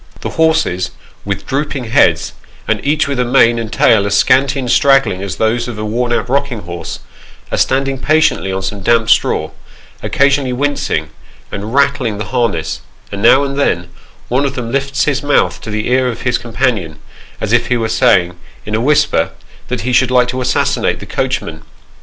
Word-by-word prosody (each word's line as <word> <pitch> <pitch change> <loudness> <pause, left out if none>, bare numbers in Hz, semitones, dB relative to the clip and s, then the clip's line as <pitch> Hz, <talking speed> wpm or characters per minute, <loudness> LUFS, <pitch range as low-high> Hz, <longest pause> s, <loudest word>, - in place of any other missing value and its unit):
The - - -3
horses, 160 - +1 0.3
with - - -4
drooping 140 -1 -2
heads, 115 -1 +2 0.3
and - - -1
each 150 +1 +1
with 140 -2 -2
a - - +3
mane 120 -1 +3
and 110 -2 -5
tail 105 -3 +3
as 100 0 +1
scanty 135 +3 +3
and 125 -3 -2
straggling 135 -9 +3
as 95 -2 -4
those 115 +3 0
of 120 -3 -6
a 105 - -4
worn 120 +3 -1
out 120 - 0
rocking 135 -3 -1
horse, 85 0 -7 0.5
are - - -1
stand 135 +1 +1
ing 135 -1 -3
patiently 155 -10 +1
on 95 0 -3
some 100 +1 -4
damp 115 +2 +2
straw, - - +1 0.5
occasionally 140 -2 +1
wincing, 145 +3 -1 0.4
and 105 +5 -5
rattling 140 -6 +1
the 105 - -4
harness; 85 -11 -1 0.3
and 100 - -5
now 135 +5 +5
and 140 0 -3
then, 85 -10 0 0.4
one 130 +3 +1
of 140 -1 -2
them 115 -2 -4
lifts 140 +1 0
his 145 -2 0
mouth 145 -1 +1
to - - -8
the 105 0 -3
ear 130 +1 +2
of 120 - -4
his 125 -1 0
companion, 115 - -2 0.4
as 105 - -2
if 120 0 +2
he 125 - +1
were 115 -1 -1
saying, 110 -7 +2 0.3
in 105 - -6
a 110 - 0
whisper, 145 - +2 0.4
that 125 -1 -3
ho 125 - -2
should 125 +1 +3
like 125 -1 +3
to 130 +1 -3
assassinate 125 - 0
the - - -9
coachman. 80 -1 -3
125 Hz, 190 wpm, -15 LUFS, 110-135 Hz, 0.5 s, now